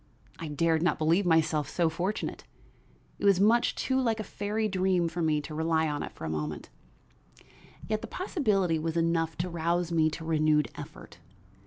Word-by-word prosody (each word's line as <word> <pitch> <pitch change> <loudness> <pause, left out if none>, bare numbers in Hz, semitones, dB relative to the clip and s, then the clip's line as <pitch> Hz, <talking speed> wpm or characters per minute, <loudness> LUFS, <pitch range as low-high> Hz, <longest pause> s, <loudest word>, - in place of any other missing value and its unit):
I 165 - -5
dared 160 +2 +1
not 170 -2 +2
believe 170 +5 +2
myself 155 -3 +2
so 170 -2 +1
fortunate; 180 +6 -3 0.8
it - - -9
was 200 -2 +5
much 225 +4 +3
too 265 0 0
like 225 -3 0
a - - -2
fairy 210 +2 -2
dream 185 -3 +1
for 170 +1 -4
me 155 -2 +1
to 155 +1 -8
rely 160 0 +1
on 145 -1 -2
it - - -5
for - - -9
a - - -3
moment; 75 -1 -4 1.2
yet 215 0 -1
the - - -6
possibility 205 - 0
was 165 +1 -2
enough 165 -1 0
to 175 +2 -1
rouse 170 +1 0
me 160 -2 +3
to 160 +1 -7
renewed 155 -4 +2
effort. - - -11
165 Hz, 180 wpm, -29 LUFS, 155-190 Hz, 1.2 s, was